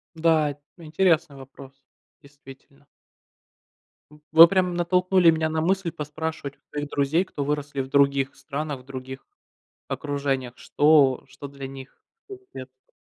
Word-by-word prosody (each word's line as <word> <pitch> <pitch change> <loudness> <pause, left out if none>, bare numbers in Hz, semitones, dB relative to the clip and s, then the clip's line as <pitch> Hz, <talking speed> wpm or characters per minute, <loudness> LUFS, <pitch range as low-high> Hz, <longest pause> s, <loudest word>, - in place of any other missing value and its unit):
Да, 160 -2 +2
это 145 +1 -14 0.2
интересный 165 -2 +1
вопрос, 135 0 -13 0.5
действительно. 140 -1 -17 1.2
М, 150 - -18
вы 165 +1 +10
прямо 185 0 +1
натолкнули 180 +1 +3
меня 160 -1 +1
на 160 0 -1
мысль 185 0 0
поспрашивать 150 -1 -6 0.2
друзей, 145 +3 0
кто 145 - -5
выросли 145 -1 -3
в 130 - -6
других 140 0 +2
странах, 140 -1 -6
других 130 0 -9 0.6
окружениях. 140 -4 -3
Что 145 -3 +3
что 140 - -10
для 140 -1 -9
них 135 0 -12 0.2
вкус 395 -1 -11
детства. 130 0 -12
145 Hz, 125 wpm, -24 LUFS, 135-160 Hz, 1.2 s, вы